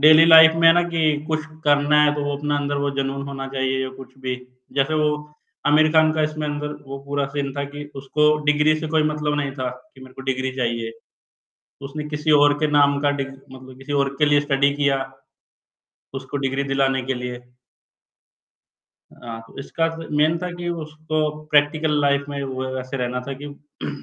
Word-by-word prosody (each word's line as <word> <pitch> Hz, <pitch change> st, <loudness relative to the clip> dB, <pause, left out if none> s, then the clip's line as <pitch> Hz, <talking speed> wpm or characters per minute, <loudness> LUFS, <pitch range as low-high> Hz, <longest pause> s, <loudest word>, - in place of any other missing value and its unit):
Daily 155 Hz, +2 st, +8 dB
life 160 Hz, -1 st, +9 dB
में 165 Hz, 0 st, +4 dB
है -, -, +9 dB
ना, 175 Hz, -, +4 dB
कि 155 Hz, -3 st, 0 dB
कुछ 155 Hz, -1 st, -1 dB, 0.2 s
करना 145 Hz, +1 st, +4 dB
है 150 Hz, 0 st, +3 dB
तो 145 Hz, -, -3 dB
वो 145 Hz, 0 st, -2 dB
अपना 145 Hz, 0 st, -1 dB
अंदर 145 Hz, 0 st, -2 dB
वो 140 Hz, -, 0 dB
जुनून 135 Hz, 0 st, -2 dB
होना 135 Hz, -1 st, -5 dB
चाहिए 130 Hz, 0 st, -1 dB
या 130 Hz, -, -3 dB
कुछ 130 Hz, 0 st, -13 dB
भी। 130 Hz, -1 st, -3 dB, 0.4 s
जैसे 140 Hz, +3 st, +2 dB
वो 150 Hz, 0 st, +3 dB, 0.6 s
आमिर 155 Hz, +1 st, +5 dB
खान 155 Hz, -1 st, +5 dB
का 155 Hz, -, 0 dB
इसमें 155 Hz, 0 st, -2 dB
अंदर 150 Hz, 0 st, -3 dB, 0.2 s
वो 135 Hz, 0 st, -6 dB
पूरा 140 Hz, 0 st, -1 dB
सीन 140 Hz, -1 st, -2 dB
था 140 Hz, -, -1 dB
कि 145 Hz, 0 st, -6 dB
उसको 150 Hz, +3 st, +2 dB
डिग्री 150 Hz, +1 st, +3 dB
से 160 Hz, -, -3 dB
कोई 160 Hz, 0 st, +2 dB
मतलब 150 Hz, -1 st, -1 dB
नहीं 140 Hz, -1 st, -3 dB
था, 130 Hz, -2 st, -3 dB
कि 130 Hz, +2 st, -16 dB
मेरे 130 Hz, -1 st, -13 dB
को 135 Hz, -, -9 dB
डिग्री 130 Hz, 0 st, -2 dB
चाहिए। 115 Hz, -2 st, -2 dB, 1.0 s
उसने 150 Hz, +2 st, -6 dB
किसी 150 Hz, +1 st, -1 dB
और 145 Hz, -1 st, +6 dB
के 155 Hz, -, +2 dB
नाम 145 Hz, -1 st, +4 dB
का 145 Hz, -, +2 dB
डिग्री 135 Hz, -1 st, -6 dB
मतलब 130 Hz, 0 st, -13 dB
किसी 135 Hz, +2 st, -6 dB
और 140 Hz, -1 st, +2 dB
के 150 Hz, -, +5 dB
लिए 145 Hz, 0 st, +4 dB
स्टडी 140 Hz, -1 st, +2 dB
किया, 140 Hz, -2 st, +1 dB, 1.1 s
उसको 135 Hz, +1 st, -5 dB
डिग्री 135 Hz, 0 st, -1 dB
दिलाने 135 Hz, -1 st, +1 dB
के 135 Hz, +1 st, -1 dB
लिए। 125 Hz, -1 st, -5 dB, 1.8 s
हाँ, 115 Hz, -1 st, -7 dB
तो -, -, -15 dB
इसका 165 Hz, +4 st, -1 dB
फिर 165 Hz, -1 st, -8 dB
मेन 155 Hz, +2 st, +3 dB
था 180 Hz, +1 st, -4 dB
कि 175 Hz, 0 st, -5 dB, 0.2 s
उसको 155 Hz, +1 st, -4 dB, 0.3 s
प्रैक्टिकल 150 Hz, +1 st, +2 dB
लाइफ 140 Hz, 0 st, +2 dB
में 140 Hz, -1 st, -4 dB
वो 130 Hz, -1 st, -4 dB
ऐसे 130 Hz, +1 st, -6 dB
रहना 125 Hz, 0 st, -2 dB
था -, -, -3 dB
कि 145 Hz, 0 st, -8 dB
145 Hz, 195 wpm, -22 LUFS, 135-150 Hz, 1.8 s, लाइफ